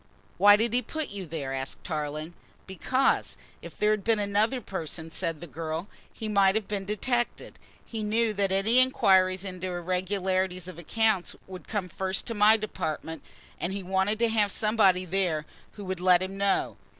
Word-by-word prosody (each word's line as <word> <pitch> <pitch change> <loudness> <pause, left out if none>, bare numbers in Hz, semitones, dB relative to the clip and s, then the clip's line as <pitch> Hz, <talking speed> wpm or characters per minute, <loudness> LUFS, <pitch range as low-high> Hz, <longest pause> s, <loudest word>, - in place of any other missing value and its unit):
"Why 205 0 +8
did 225 +2 0
he 250 - +3
put 315 +6 -5
you 200 -3 -7
there?" 145 -4 -4
asked 135 0 -4
Tarling. 155 0 -4 0.3
"Because, 255 +8 0 0.2
if - - -11
there 210 0 +3
had 215 -2 0
been 225 +1 +2
another 210 +5 +1
person," 165 -6 -5
said 165 -2 -2
the - - -6
girl, 160 +3 -5 0.2
"he 220 - -6
might 200 -2 +4
have 220 -2 -1
been 200 -2 -3
detected. 240 +4 -2 0.3
He 225 -2 -5
knew 220 +1 +1
that 195 -1 0
any 205 +6 +4
inquiries 190 -8 +4
into 185 -1 -5
irregularities 185 0 -1
of 185 -2 -9
accounts 215 +1 +1
would 185 -1 -10
come 205 -4 -2
first 190 +2 -3
to 230 - -4
my 215 +1 +5
department, 160 -6 -4 0.4
and 180 - -2
he 200 -1 -4
wanted 190 +3 0
to 230 +1 +2
have 210 -2 +2
somebody 200 -4 +2
there 175 -4 0 0.3
who 205 - -9
would 185 -1 -3
let 180 0 +5
him 190 +1 -5
know. 200 0 0
195 Hz, 175 wpm, -27 LUFS, 180-215 Hz, 0.4 s, Why